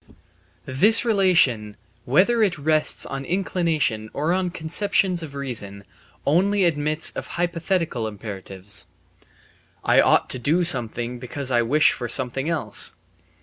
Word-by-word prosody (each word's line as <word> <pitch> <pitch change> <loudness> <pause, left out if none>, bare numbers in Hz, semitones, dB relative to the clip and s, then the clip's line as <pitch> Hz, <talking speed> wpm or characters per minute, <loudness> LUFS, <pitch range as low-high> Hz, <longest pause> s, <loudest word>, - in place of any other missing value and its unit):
This 210 - +3
relation, 170 - +2 0.3
whether 200 - +3
it 190 -6 +2
rests 155 +1 +1
on 135 0 -5
inclination 160 - -1
or 155 +4 0
on 185 -1 0
conceptions 180 +2 0
of 150 -3 -8
reason, 110 -8 -4 0.4
only 195 +6 +2
admits 155 -1 0
of - - -6
hypothetical 170 -7 -1
imperatives: 100 -2 -7 1.0
"I - - +4
ought - - +3
to 130 - -3
do 160 +9 +1
something 120 -5 0
because 130 +2 -4
I 120 -1 +3
wish 145 +7 +3
for 120 -2 -5
something 135 +4 0
else." 150 -11 +1
150 Hz, 125 wpm, -23 LUFS, 120-175 Hz, 1.0 s, I